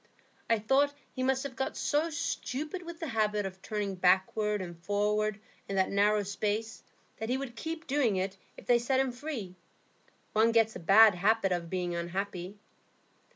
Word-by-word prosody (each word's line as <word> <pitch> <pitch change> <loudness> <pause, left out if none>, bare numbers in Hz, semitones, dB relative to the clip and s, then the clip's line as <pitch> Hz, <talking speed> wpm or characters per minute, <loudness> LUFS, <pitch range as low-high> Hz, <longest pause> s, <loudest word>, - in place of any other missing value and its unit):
I 230 - +4
thought 270 +7 +2 0.2
he 255 - -4
must 265 +1 +1
have 275 -3 -6
got 265 - -3
so 305 +3 +1
stupid 310 +1 -3
with 340 -1 -9
the 325 - -4
habit 210 -3 0
of 190 0 -7
turning 210 -2 -3
backward 190 +3 +2
and 175 -2 -6
forward 210 +1 0 0.3
in 195 - -2
that 190 -1 +2
narrow 205 +1 +3
space 210 +3 -2 0.4
that 220 +1 -4
he 255 - +1
would 265 -3 -6
keep 325 +4 -5
doing 265 -7 +1
it 190 +1 -2 0.2
if - - -12
they 240 -1 +4
set 260 +3 +1
him 265 -1 +1
free. 245 -8 -6 0.8
One 220 +2 +4
gets 225 -1 +3
a - - -5
bad 205 +5 +7
habit 195 +2 +2
of 175 -2 -2
being 180 -1 -2
unhappy." 180 +2 -4
215 Hz, 175 wpm, -30 LUFS, 195-260 Hz, 0.8 s, bad